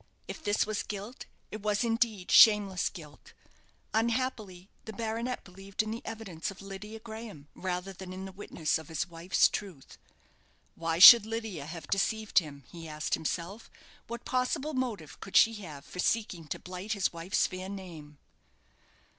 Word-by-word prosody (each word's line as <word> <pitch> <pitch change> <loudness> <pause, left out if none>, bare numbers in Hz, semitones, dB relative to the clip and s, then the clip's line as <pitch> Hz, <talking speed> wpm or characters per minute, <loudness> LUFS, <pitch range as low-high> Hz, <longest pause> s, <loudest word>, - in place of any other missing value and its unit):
If - - -7
this 205 -1 +2
was 210 -1 -2
guilt, 210 +5 -7 0.2
it 215 - -6
was, 210 +2 +1
indeed, 225 -5 0
shameless 205 -4 +6
guilt. 150 -6 -13 0.6
Unhappily, 220 -5 -1 0.2
the 220 - -7
baronet 230 +3 -3
believed 195 +3 -4
in 215 - -5
the 230 +2 -5
evidence 205 -8 -5
of 195 - -10
Lydia 200 +3 -8
Graham, 220 -9 -9
rather 185 +1 -4
than 185 0 -9
in 190 +1 -6
the 190 - -8
witness 175 -5 -2
of 160 - -11
his 160 0 -2
wife's 170 +2 +2
truth. 185 -10 -7 0.7
Why 165 0 -2
should 215 +4 +11
Lydia 220 -10 -4
have 165 0 -7
deceived 215 +2 +2
him? 145 -5 -10
he 165 -1 -9
asked 155 0 -4
himself. 175 +7 -3 0.4
What 235 +1 -7
possible 265 +4 -1
motive 225 - -3
could 195 - 0
she 225 - +6
have 150 -6 -9
for 180 - -10
seeking 180 -6 0
to - - -4
blight 185 +4 -5
his 200 -4 0
wife's 170 +3 0
fair 185 +1 -5
name? 165 -7 -9
195 Hz, 160 wpm, -30 LUFS, 175-220 Hz, 0.7 s, should